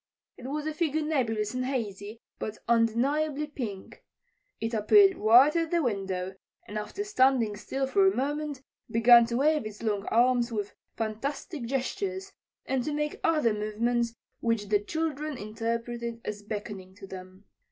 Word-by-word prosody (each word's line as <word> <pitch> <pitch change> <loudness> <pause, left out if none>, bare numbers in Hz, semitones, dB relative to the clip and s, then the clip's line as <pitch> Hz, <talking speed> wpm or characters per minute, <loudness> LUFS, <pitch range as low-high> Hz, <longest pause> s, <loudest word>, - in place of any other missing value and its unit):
It 250 - -9
was 295 +2 -3
a 310 - -2
figure 315 -1 0
nebulous 225 -8 0
and 255 0 -1
hazy, 225 -4 -4 0.2
but 215 0 -4
undeniably 275 +6 +2
pink. 230 -10 -7 0.6
It 225 +1 -3
appeared 385 - +6
right 245 +8 +6
at 330 -1 +1
the 340 -1 +1
window, 190 -5 -2 0.3
and 210 - -8
after 215 - -4
standing 260 - +2
still 270 +6 -3
for 385 +8 +3
a 385 - +2
moment 290 0 -2 0.3
began 235 +1 +7
to 235 0 -1
wave 305 +2 +3
its 210 +1 -10
long 210 -2 -1
arms 240 +1 +3
with 205 -3 -3 0.2
fantastic 260 +5 -4
gestures, 380 - -3 0.3
and 260 -2 0
to 300 - -2
make 300 0 -2
other 305 -9 +3
movements 230 +3 -1 0.2
which 230 -4 -1
the 210 -1 +4
children 305 +4 -3
interpreted 230 +2 -3
as 210 -1 -4
beckoning 205 -3 -6
to 200 - -10
them. 185 +1 -11
235 Hz, 150 wpm, -28 LUFS, 215-295 Hz, 0.6 s, began